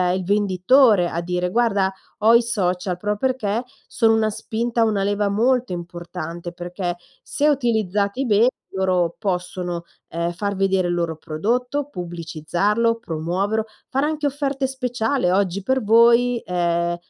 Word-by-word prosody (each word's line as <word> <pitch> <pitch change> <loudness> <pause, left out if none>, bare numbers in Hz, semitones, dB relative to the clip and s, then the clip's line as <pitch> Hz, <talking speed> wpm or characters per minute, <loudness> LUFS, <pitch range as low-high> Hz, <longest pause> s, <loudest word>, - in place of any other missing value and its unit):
il 185 - -2
venditore 205 +2 +4
a 170 - -3
dire: 180 +1 -2
"Guarda, 200 -3 +1 0.3
ho 220 +2 +5
i 235 - +7
social", 185 -5 -1
proprio 210 +3 -1
perché 235 -2 -1 0.2
sono 225 -2 +3
una 220 -1 +2
spinta, 230 +2 -1
una 210 -3 +1
leva 205 0 0
molto 245 +3 +1
importante, 175 -1 -6
perché 175 0 -4 0.3
se 295 - 0
utilizzati 220 -4 +1
bene, 225 +1 +4 0.2
loro 185 -3 +1
possono, 180 -3 -3 0.3
ehm, 170 +1 -2
far 200 +3 -3
vedere 190 -1 +1
il 175 - 0
loro 170 -2 -2
prodotto, 245 - -2
pubblicizzarlo, 175 - -1
promuoverlo, 190 +6 -2 0.2
fare 270 +2 0
anche 305 -1 -1
offerte 275 -1 -1
speciali: 250 -3 -1
"Oggi 190 0 +1
per 260 +2 0
voi, 235 +2 +5
ehm, 175 -1 0
200 Hz, 135 wpm, -22 LUFS, 175-235 Hz, 0.3 s, i